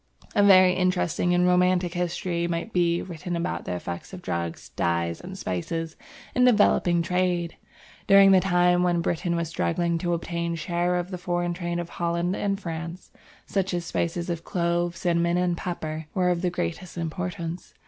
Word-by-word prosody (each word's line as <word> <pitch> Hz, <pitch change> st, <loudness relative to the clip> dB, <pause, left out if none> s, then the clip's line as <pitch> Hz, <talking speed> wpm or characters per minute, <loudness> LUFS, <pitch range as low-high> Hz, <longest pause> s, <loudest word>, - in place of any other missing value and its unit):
A -, -, +3 dB
very 185 Hz, -2 st, +7 dB
interesting 180 Hz, -1 st, +1 dB
and 180 Hz, 0 st, +3 dB
romantic 180 Hz, -1 st, +3 dB
history 175 Hz, -1 st, -1 dB
might 170 Hz, +6 st, -3 dB
be 170 Hz, -1 st, +2 dB
written 175 Hz, 0 st, -5 dB
about 170 Hz, 0 st, -3 dB
the 90 Hz, -, -3 dB
effect 85 Hz, -, -6 dB
of 180 Hz, -1 st, -8 dB
drugs, 85 Hz, -, -4 dB
dyes, 85 Hz, 0 st, -1 dB
and 190 Hz, +1 st, -8 dB
spices 160 Hz, -, -3 dB, 0.4 s
in 250 Hz, -, +3 dB
developing 205 Hz, -7 st, +4 dB
trade. 180 Hz, -1 st, 0 dB, 0.5 s
During 195 Hz, 0 st, +7 dB
the 190 Hz, -, +7 dB
time 180 Hz, -1 st, +3 dB
when 175 Hz, -1 st, +2 dB
Britain 170 Hz, +1 st, -1 dB
was 170 Hz, -1 st, -2 dB
struggling 165 Hz, -, 0 dB
to 175 Hz, 0 st, 0 dB
obtain 170 Hz, 0 st, -3 dB
a -, -, -2 dB
share 175 Hz, +2 st, 0 dB
of 180 Hz, +1 st, -2 dB
the 180 Hz, -, -5 dB
foreign 175 Hz, 0 st, -1 dB
trade 175 Hz, 0 st, -3 dB
of 170 Hz, -1 st, -4 dB
Holland 170 Hz, +2 st, -1 dB
and 200 Hz, -1 st, -1 dB
France, 170 Hz, -1 st, -6 dB, 0.3 s
such 190 Hz, -2 st, -1 dB
spices 170 Hz, 0 st, -2 dB
as 170 Hz, -1 st, -3 dB
Clove, 170 Hz, 0 st, -1 dB
Cinnamon, 170 Hz, 0 st, +1 dB
and 180 Hz, -1 st, +1 dB
Pepper 160 Hz, -3 st, -5 dB
were 180 Hz, -2 st, +2 dB
of 175 Hz, -1 st, 0 dB
the 180 Hz, -, +1 dB
greatest 175 Hz, -, -4 dB
importance. 170 Hz, +1 st, -4 dB
175 Hz, 170 wpm, -25 LUFS, 170-180 Hz, 0.5 s, very